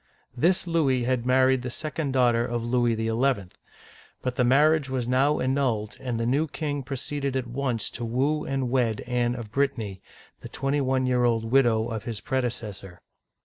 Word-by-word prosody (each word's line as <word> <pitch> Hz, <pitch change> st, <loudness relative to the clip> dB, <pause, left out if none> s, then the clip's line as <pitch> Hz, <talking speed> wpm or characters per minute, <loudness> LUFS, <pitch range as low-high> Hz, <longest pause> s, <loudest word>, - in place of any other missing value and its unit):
This 175 Hz, +10 st, +2 dB
Louis 145 Hz, -7 st, +1 dB
had 125 Hz, 0 st, 0 dB
married 130 Hz, 0 st, +4 dB
the 125 Hz, -, -4 dB
second 150 Hz, +2 st, -3 dB
daughter 120 Hz, -3 st, +3 dB
of 120 Hz, -1 st, -2 dB
Louis 120 Hz, -1 st, +1 dB
XL, 110 Hz, +2 st, -1 dB, 1.0 s
but 125 Hz, -1 st, -2 dB
the 125 Hz, -, +2 dB
marriage 145 Hz, +3 st, +4 dB
was 130 Hz, -2 st, -2 dB
now 135 Hz, +4 st, +2 dB
annulled, 130 Hz, -6 st, 0 dB
and 120 Hz, -3 st, -3 dB
the 115 Hz, -, 0 dB
new 140 Hz, +7 st, +1 dB
king 145 Hz, -1 st, -3 dB
proceeded 140 Hz, +1 st, -3 dB
at 130 Hz, -2 st, -1 dB
once 120 Hz, -2 st, -2 dB
to 120 Hz, -, -6 dB
woo 135 Hz, +6 st, 0 dB
and 135 Hz, -3 st, -2 dB
wed 120 Hz, -5 st, +1 dB
Anne 120 Hz, -1 st, 0 dB
of 115 Hz, -4 st, -7 dB
Brittany, 115 Hz, -8 st, -1 dB, 0.4 s
the -, -, -9 dB
twenty 140 Hz, +1 st, -1 dB
one 130 Hz, -1 st, +1 dB
year 125 Hz, -1 st, +2 dB
old 115 Hz, -1 st, +1 dB
widow 120 Hz, -4 st, +3 dB
of 110 Hz, -2 st, -5 dB
his 115 Hz, -3 st, -4 dB
predecessor. 115 Hz, -9 st, -4 dB
125 Hz, 175 wpm, -26 LUFS, 120-135 Hz, 1.0 s, married